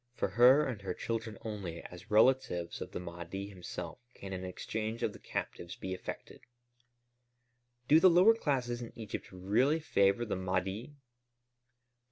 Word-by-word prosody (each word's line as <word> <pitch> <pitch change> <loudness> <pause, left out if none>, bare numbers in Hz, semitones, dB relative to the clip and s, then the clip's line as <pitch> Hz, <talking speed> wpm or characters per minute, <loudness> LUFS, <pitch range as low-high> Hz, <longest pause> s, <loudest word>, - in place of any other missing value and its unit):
For - - -1
her 125 +8 +6
and 115 -6 -4
her 95 - -4
children 115 -1 -3
only, 100 -7 -5
as 90 +4 -11
relatives 105 -6 +3
of - - -6
the - - -4
Mahdi 90 +3 -6
himself, 95 -3 -7 0.2
can 95 -1 -7
an 95 0 -4
exchange 110 +4 -4
of - - 0
the - - -12
captives 85 +1 -5
be 95 - -5
effected." 95 - -7 1.5
"Do 155 - +7
the 185 - +8
lower 180 +6 +7
classes 125 - -1
in 120 - -7
Egypt 110 -2 -6
really 105 - +2
favor 100 -6 +2
the 105 - -2
Mahdi?" 95 - -2
105 Hz, 150 wpm, -32 LUFS, 95-125 Hz, 1.5 s, the